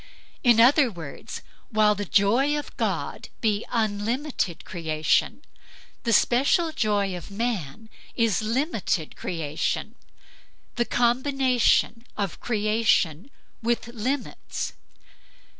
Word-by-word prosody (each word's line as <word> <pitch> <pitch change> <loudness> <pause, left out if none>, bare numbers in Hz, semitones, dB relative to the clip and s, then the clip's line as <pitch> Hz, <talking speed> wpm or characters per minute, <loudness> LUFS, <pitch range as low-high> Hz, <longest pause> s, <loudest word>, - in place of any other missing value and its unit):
In 240 -2 +5
other 260 +3 +6
words, 165 -8 -8 0.3
while 215 -3 +4
the 205 0 -4
joy 240 +11 +3
of 295 - -6
God - - -3
be 215 -2 +1
unlimited 220 - -1
creation, 160 -3 0 0.6
the 230 - +1
special 275 +9 +3
joy 205 -9 0
of 175 - -8
man 215 - -3 0.3
is 230 -5 +2
limited 220 - -1
creation, 160 -3 -3 0.8
the 240 - +1
combination 245 -2 +2
of 200 -4 -3
creation 215 - +1 0.3
with 235 0 -1
limits. 245 +4 -3
220 Hz, 95 wpm, -25 LUFS, 200-245 Hz, 0.8 s, other